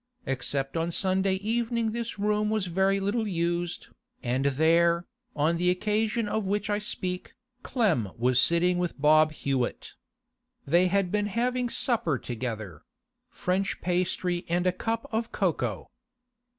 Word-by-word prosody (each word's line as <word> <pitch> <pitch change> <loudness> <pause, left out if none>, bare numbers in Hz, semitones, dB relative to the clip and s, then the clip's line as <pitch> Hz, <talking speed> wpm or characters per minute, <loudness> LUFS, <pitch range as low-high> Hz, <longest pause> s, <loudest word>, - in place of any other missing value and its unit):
Except 135 +1 -2
on 165 +1 0
Sunday 190 +2 +1
evening 230 +2 -1
this 235 0 -4
room 210 +1 +1
was 215 -3 0
very 190 +3 +1
little 210 +3 -1
used, 175 -1 -2 0.3
and 130 +2 0
there, 170 +4 +3 0.3
on 155 +3 +2
the 180 +1 +2
occasion 215 +4 0
of 215 +1 -1
which 205 +1 -1
I 205 - +1
speak, 185 -3 -3 0.3
Clem 175 - +1
was 125 +1 +3
sitting 175 +1 +3
with 175 -4 -2
Bob 155 +1 +5
Hewett. 135 -5 -2 0.7
They 175 +5 +4
had 190 -1 +1
been 205 0 +1
having 245 +3 0
supper 220 - 0
together—French 180 - -5
pastry 180 0 0
and 175 +1 +1
a 185 - +4
cup 225 +5 -3
of 225 +1 -2
cocoa. - - -1
185 Hz, 135 wpm, -27 LUFS, 165-215 Hz, 0.7 s, Bob